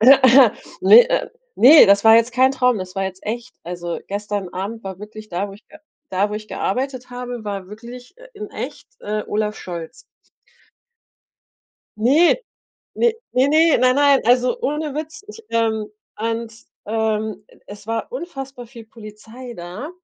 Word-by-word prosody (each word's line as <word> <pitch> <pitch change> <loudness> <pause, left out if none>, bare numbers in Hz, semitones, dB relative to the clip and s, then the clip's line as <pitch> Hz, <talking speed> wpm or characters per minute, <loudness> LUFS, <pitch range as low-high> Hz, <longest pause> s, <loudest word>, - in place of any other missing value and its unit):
Ne 265 - +6
äh, - - 0 0.3
ne, 285 +1 +8
das 200 +1 +4
war 225 0 +8
jetzt 230 +1 +2
kein 260 +2 +4
Traum, 250 -4 +1
das 185 0 -7
war 195 -1 -2
jetzt 190 0 -7
echt. 235 +3 -5
Also, 175 -1 -5
gestern 205 -1 -4
Abend 205 +5 -5
war 190 -1 -7
wirklich 215 +1 -11
da, 185 +3 -3
wo - - -10
ich 210 - -16
ge 310 - -15 0.3
da, 200 +2 0
wo - - -4
ich 215 0 -6
gearbeitet 255 +3 -3
habe, 245 -2 -7
war 200 -3 -5
wirklich, 240 - -12
äh, - - -15
in 425 +1 -8
echt, - - -7
äh, 210 0 -3
Olaf 210 0 -2
Scholz. 170 - -8 2.0
Ne, 280 +11 +4 0.6
ne, 475 -1 +2 0.2
ne, 260 +2 +3
ne, 320 +1 +4
nein, 255 +1 +3
nein, 285 -1 +4
also, 250 - +2
ohne 300 - -2
Witz, 310 +3 -6
ich 450 +1 -12
ähm, 220 -2 0 0.3
und, 230 +1 -3 0.3
ähm, 215 -1 -2 0.2
es 205 0 -12
war 225 - -3
unfassbar 270 - -7
viel 230 -1 -13
Polizei 225 +3 -11
da 180 - -7
230 Hz, 160 wpm, -20 LUFS, 210-265 Hz, 2.0 s, ne